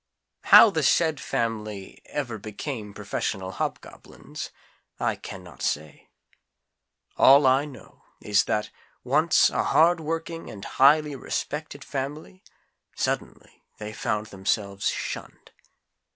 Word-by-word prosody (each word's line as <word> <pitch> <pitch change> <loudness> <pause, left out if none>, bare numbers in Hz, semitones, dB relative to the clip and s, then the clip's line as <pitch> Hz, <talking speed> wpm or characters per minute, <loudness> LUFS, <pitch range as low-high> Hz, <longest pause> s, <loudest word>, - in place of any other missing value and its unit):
How 225 - +9
the 160 - 0
SAID 160 +1 +2
family 105 -4 -4
ever 120 -7 -4
became 110 +1 -6
professional 100 -2 -4
Hobgoblins, - - -6 0.5
I - - 0
can 95 - -9
not 85 -6 -14
say. 75 0 -3 1.1
All 140 +1 +7
I 130 +2 +4
know 130 -9 -14 0.2
is 105 -1 +2
that, 105 0 -1 0.3
once 155 +6 +4
a - - 0
hardworking 165 0 +1
and 100 -2 -9
highly 145 +2 +4
respected 145 +2 -5
family, 145 +7 -6 0.5
suddenly - - -4 0.2
they 105 0 -7
found 105 0 -2
themselves 100 0 -1
shunned. - - -6
130 Hz, 110 wpm, -25 LUFS, 105-150 Hz, 1.1 s, How